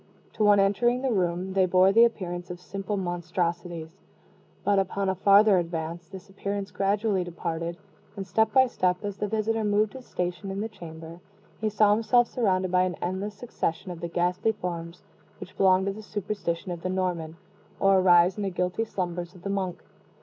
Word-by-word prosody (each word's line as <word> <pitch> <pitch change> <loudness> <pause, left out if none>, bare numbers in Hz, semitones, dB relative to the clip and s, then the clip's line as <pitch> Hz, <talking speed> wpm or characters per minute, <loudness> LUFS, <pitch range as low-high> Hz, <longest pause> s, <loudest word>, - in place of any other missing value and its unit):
To - - -1
one 205 -1 +6
entering 240 +6 +2
the 265 - +1
room, 185 -2 -1
they 190 -1 +3
bore 185 +1 +5
the 230 +3 +7
appearance 180 -6 -3
of 180 0 -7
simple 195 +2 -4
monstrosities; 175 -1 -3 0.6
but 200 -1 +3
upon 195 0 -1
a - - +2
farther 200 +1 +5
advance, 165 0 -4
this 190 +1 -10
appearance 200 0 -4
gradually 200 +1 0
departed; 170 0 -4 0.4
and, 195 -2 -5
step 220 +2 +1
by 260 +3 +6
step, 185 -5 -1
as 200 -1 -4
the 210 - -2
visitor 220 +1 0
moved 210 0 +1
his 260 -2 -11
station 180 +1 -3
in 195 +1 -4
the 215 - -2
chamber, 165 -3 -10 0.4
he 220 - 0
saw 210 0 +4
himself 235 +3 +3
surrounded 190 -7 0
by 180 0 +4
an 185 -1 0
endless 190 +4 -3
succession 190 -5 -3
of 170 - -8
the 170 - -2
ghastly 180 +5 0
forms 170 -3 -6 0.4
which - - -10
belong 190 -1 +4
to 200 - -1
the 215 - -9
superstition 200 -4 -4
of 170 -1 -5
the 185 - -3
Norman, 175 -4 -2 0.4
or 195 -1 +5
arise 180 0 +5
in - - -3
the 200 - -1
guilty 180 +4 -1
slumbers 175 -4 -4
of 180 - -15
the 200 - -2
monk. 190 -3 -3
190 Hz, 185 wpm, -26 LUFS, 175-205 Hz, 0.6 s, the